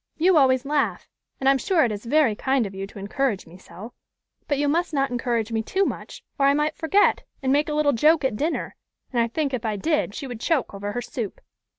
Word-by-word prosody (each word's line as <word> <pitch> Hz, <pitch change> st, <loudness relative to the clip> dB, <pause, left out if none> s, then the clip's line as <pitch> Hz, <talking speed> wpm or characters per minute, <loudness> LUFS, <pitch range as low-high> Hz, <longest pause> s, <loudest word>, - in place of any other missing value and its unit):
You 355 Hz, +3 st, +4 dB
always 260 Hz, -3 st, +4 dB
laugh, 290 Hz, 0 st, -1 dB, 0.3 s
and 270 Hz, -, -1 dB
I -, -, +8 dB
am 275 Hz, -, +2 dB
sure 335 Hz, +5 st, +2 dB
it 235 Hz, -, -1 dB
is 210 Hz, +2 st, -6 dB
very 290 Hz, -4 st, +3 dB
kind 265 Hz, +2 st, 0 dB
of 195 Hz, -, -7 dB
you 195 Hz, 0 st, -5 dB
to 200 Hz, -, -14 dB
encourage 205 Hz, +2 st, -1 dB
me 165 Hz, -, -15 dB
so; 215 Hz, +5 st, -11 dB, 0.5 s
but 285 Hz, -, 0 dB
you 290 Hz, +1 st, +1 dB
must 330 Hz, +2 st, 0 dB
not 275 Hz, -1 st, +1 dB
encourage 235 Hz, -2 st, -1 dB
me 225 Hz, -1 st, 0 dB
too 385 Hz, -, 0 dB
much, -, -, -6 dB, 0.2 s
or 275 Hz, -, +4 dB
I 280 Hz, -, +4 dB
might 300 Hz, +1 st, 0 dB
forget, 390 Hz, +6 st, +3 dB, 0.2 s
and 265 Hz, 0 st, +2 dB
make 295 Hz, +2 st, +2 dB
a 300 Hz, -, -1 dB
little 295 Hz, -1 st, +3 dB
joke 300 Hz, +4 st, +4 dB
at 260 Hz, -, 0 dB
dinner, 310 Hz, +9 st, -2 dB, 0.4 s
and 240 Hz, -, +2 dB
I 230 Hz, -, +2 dB
think, 280 Hz, +3 st, -2 dB
if 250 Hz, -, -2 dB
I 220 Hz, -2 st, -1 dB
did, 300 Hz, -1 st, 0 dB
she 290 Hz, -, -5 dB
would 245 Hz, -4 st, -7 dB
choke 285 Hz, -3 st, 0 dB
over 205 Hz, +1 st, -5 dB
her 245 Hz, -, -3 dB
soup." 235 Hz, -4 st, -5 dB
270 Hz, 245 wpm, -24 LUFS, 225-300 Hz, 0.5 s, I